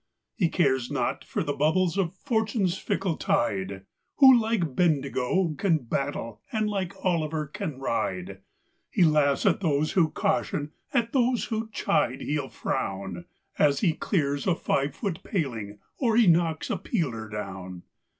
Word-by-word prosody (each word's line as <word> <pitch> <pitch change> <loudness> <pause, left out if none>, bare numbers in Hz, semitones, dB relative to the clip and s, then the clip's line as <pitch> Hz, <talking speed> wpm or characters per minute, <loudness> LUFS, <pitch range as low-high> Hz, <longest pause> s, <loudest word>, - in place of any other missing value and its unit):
He 175 -6 +1
cares 130 -8 +1
not - - -1
for - - -2
the 145 - -1
bubbles 165 +5 +2
of 190 -2 -1
Fortune's 220 -5 0
fickle 190 -3 -2
tide, 95 -3 -1 0.3
Who 265 -2 +8
like 220 - 0
Bendigo 155 +1 +1
can 175 -5 +3
battle, 115 -3 -3
and 215 -1 0
like 195 -4 -2
Olliver 160 -3 0
can 150 -1 -5
ride. 95 -7 -2 0.5
He - - +3
laughs 150 -3 +3
at - - +3
those 155 -4 +1
who 170 -4 +3
caution, 155 -6 -1 0.2
at 235 -3 0
those 250 -2 +2
who 220 0 -3
chide 130 - 0
he'll 145 -2 -2
frown, 95 -3 -3 0.3
As 145 -1 +3
he 175 -7 +3
clears 145 -5 -1
a 180 - +3
five 140 -3 -1
foot 190 -6 -3
paling, 115 - -3 0.2
or 230 -4 +2
he 235 - +6
knocks 165 -2 +2
a - - 0
peeler 125 - -2
down. 95 -4 -6
155 Hz, 150 wpm, -27 LUFS, 130-195 Hz, 0.5 s, Who